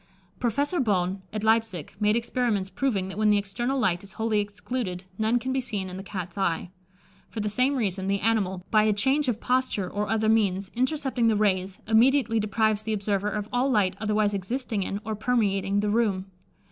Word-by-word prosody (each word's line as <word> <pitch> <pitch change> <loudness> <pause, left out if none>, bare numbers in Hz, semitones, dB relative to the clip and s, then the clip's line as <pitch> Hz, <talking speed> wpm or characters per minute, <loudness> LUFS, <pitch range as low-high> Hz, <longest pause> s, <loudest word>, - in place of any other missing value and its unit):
Professor 285 - 0
Bohn, 190 -5 0
at 215 0 -4
Leipsic, 220 -7 +1
made 210 0 +3
experiments 230 -5 0
proving 210 -9 0
that 190 +2 -6
when 215 0 +4
the 210 - +5
external 225 +7 -2
light 190 -8 +1
is 200 - -13
wholly 220 -1 0
excluded, 205 -2 -4 0.2
none 220 +2 +2
can 260 +2 -2
be 265 - +1
seen 205 -7 -4
in 180 - -7
the - - -5
Cat's 195 -1 -6
eye. 175 -1 -1 0.6
For 225 - -6
the 210 0 -1
same 255 +6 +2
reason, 195 -6 -1
the 200 0 +1
animal, 195 -4 0
by 215 - +5
a 215 0 +3
change 270 +7 +1
of 230 -3 0
posture 250 -7 0
or 205 +2 -3
other 220 0 +1
means, 200 -3 +2
intercepting 260 -1 0
the 220 - +3
rays, 190 -2 +1
immediately 230 +1 +4
deprives 215 0 +1
the 220 0 -2
observer 205 -1 -1
of 210 0 -3
all 250 +3 +2
light 205 -7 +2
otherwise 210 -1 +1
existing 215 +2 -2
in, 195 +1 -3
or 220 - -2
permeating, 200 -4 +1
the 210 - 0
room. 205 -4 +1
210 Hz, 195 wpm, -26 LUFS, 195-235 Hz, 0.6 s, the